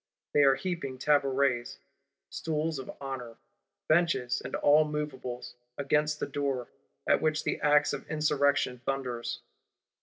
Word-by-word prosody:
They 145 Hz, -, +5 dB
are 135 Hz, -1 st, +6 dB
heaping 135 Hz, -3 st, -4 dB
tabourets 135 Hz, -, +1 dB, 0.5 s
(stools 155 Hz, -1 st, -2 dB
of 130 Hz, -, -8 dB
honour), 130 Hz, -4 st, -6 dB, 0.5 s
benches 155 Hz, -6 st, +2 dB
and -, -, -4 dB
all 150 Hz, +2 st, +5 dB
moveables, 130 Hz, -5 st, -5 dB, 0.2 s
against 150 Hz, +2 st, +1 dB
the -, -, -1 dB
door; 140 Hz, -3 st, -2 dB, 0.4 s
at -, -, +4 dB
which 155 Hz, 0 st, +1 dB
the -, -, -2 dB
axe 145 Hz, 0 st, +4 dB
of -, -, -6 dB
Insurrection 145 Hz, -4 st, +1 dB
thunders. 125 Hz, -3 st, -3 dB
140 Hz, 125 wpm, -29 LUFS, 130-150 Hz, 0.5 s, are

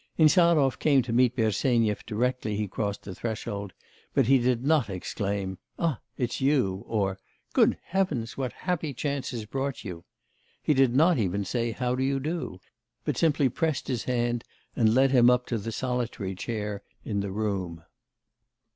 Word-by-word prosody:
Insarov 155 Hz, -4 st, +5 dB
came 140 Hz, -4 st, +4 dB
to 115 Hz, -, -4 dB
meet 125 Hz, 0 st, +4 dB
Bersenyev 110 Hz, -1 st, +1 dB
directly 120 Hz, -1 st, -1 dB
he 105 Hz, -1 st, -1 dB
crossed 100 Hz, +1 st, -3 dB
the 95 Hz, -, -7 dB
threshold, 105 Hz, -2 st, -4 dB, 0.4 s
but 135 Hz, -, +4 dB
he 135 Hz, +2 st, +5 dB
did 125 Hz, 0 st, +1 dB
not 150 Hz, -6 st, +3 dB
exclaim, 95 Hz, 0 st, -3 dB, 0.2 s
'Ah, 160 Hz, -8 st, 0 dB, 0.2 s
it's 120 Hz, 0 st, -2 dB
you!' 125 Hz, -9 st, +2 dB
or 100 Hz, -3 st, -1 dB, 0.3 s
'Good -, -, +4 dB
Heavens, 155 Hz, -12 st, -1 dB
what 130 Hz, -2 st, -2 dB
happy 165 Hz, -6 st, -3 dB
chance 140 Hz, +1 st, -2 dB
has 115 Hz, -3 st, -5 dB
brought 135 Hz, +4 st, -3 dB
you?' 90 Hz, -5 st, -7 dB, 0.6 s
He 150 Hz, -, +3 dB
did 130 Hz, -3 st, +3 dB
not 160 Hz, +1 st, +5 dB
even 100 Hz, -1 st, 0 dB
say, 115 Hz, +3 st, -1 dB
'How 125 Hz, +1 st, -1 dB
do 130 Hz, -, -1 dB
you 135 Hz, +1 st, +1 dB
do?' 155 Hz, -, -4 dB, 0.5 s
but -, -, 0 dB
simply 150 Hz, -4 st, +3 dB
pressed 155 Hz, +3 st, -1 dB
his 125 Hz, -4 st, -2 dB
hand 120 Hz, -1 st, 0 dB, 0.3 s
and 110 Hz, -1 st, +3 dB
led 135 Hz, +1 st, +5 dB
him 125 Hz, -2 st, +6 dB
up 125 Hz, 0 st, +3 dB
to 115 Hz, -, -2 dB
the 115 Hz, +3 st, -4 dB
solitary 120 Hz, -5 st, -2 dB
chair 105 Hz, 0 st, -4 dB, 0.2 s
in 105 Hz, -3 st, -1 dB
the 100 Hz, -1 st, -2 dB
room. 95 Hz, -5 st, -2 dB
120 Hz, 165 wpm, -27 LUFS, 105-135 Hz, 0.6 s, him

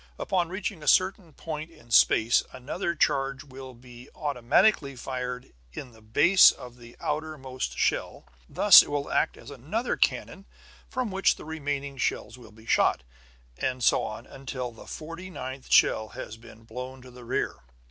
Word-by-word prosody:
Upon 180 Hz, -3 st, -1 dB
reaching 190 Hz, -2 st, -4 dB
a 150 Hz, -, -9 dB
certain 185 Hz, -2 st, +2 dB
point 155 Hz, +1 st, -6 dB
in 120 Hz, -8 st, -19 dB
space 115 Hz, 0 st, +5 dB
another 170 Hz, +7 st, -4 dB
charge 135 Hz, -2 st, 0 dB
will 130 Hz, -2 st, -11 dB
be 125 Hz, +1 st, -14 dB
automatically 145 Hz, -, +2 dB
fired 125 Hz, 0 st, -5 dB, 0.2 s
in 125 Hz, -, -8 dB
the 110 Hz, -1 st, -19 dB
base 145 Hz, -, +6 dB
of 125 Hz, -1 st, -12 dB
the 120 Hz, -1 st, -14 dB
outermost 150 Hz, -4 st, -4 dB
shell. -, -, -1 dB, 0.2 s
Thus -, -, +8 dB
it -, -, -7 dB
will 145 Hz, -1 st, -3 dB
act -, -, +1 dB
as -, -, -12 dB
another 160 Hz, -, -3 dB
cannon, 195 Hz, +1 st, -1 dB, 0.4 s
from 255 Hz, -5 st, -3 dB
which 195 Hz, +1 st, +2 dB
the -, -, -12 dB
remaining 145 Hz, -3 st, -4 dB
shells 125 Hz, -, -2 dB
will 120 Hz, -3 st, -15 dB
be 110 Hz, +1 st, -18 dB
shot. -, -, +2 dB, 0.6 s
And 130 Hz, -1 st, -2 dB
so -, -, +4 dB
on, 110 Hz, -, -6 dB
until 130 Hz, -2 st, -6 dB
the 115 Hz, -, -14 dB
forty 165 Hz, +4 st, -8 dB
ninth 130 Hz, -5 st, -8 dB
shell 110 Hz, 0 st, +4 dB
has 110 Hz, -, -8 dB
been 115 Hz, 0 st, -16 dB
blown 125 Hz, +3 st, -8 dB
to 125 Hz, -, -13 dB
the 125 Hz, 0 st, -13 dB
rear. 115 Hz, -, -2 dB
135 Hz, 165 wpm, -27 LUFS, 125-160 Hz, 0.6 s, Thus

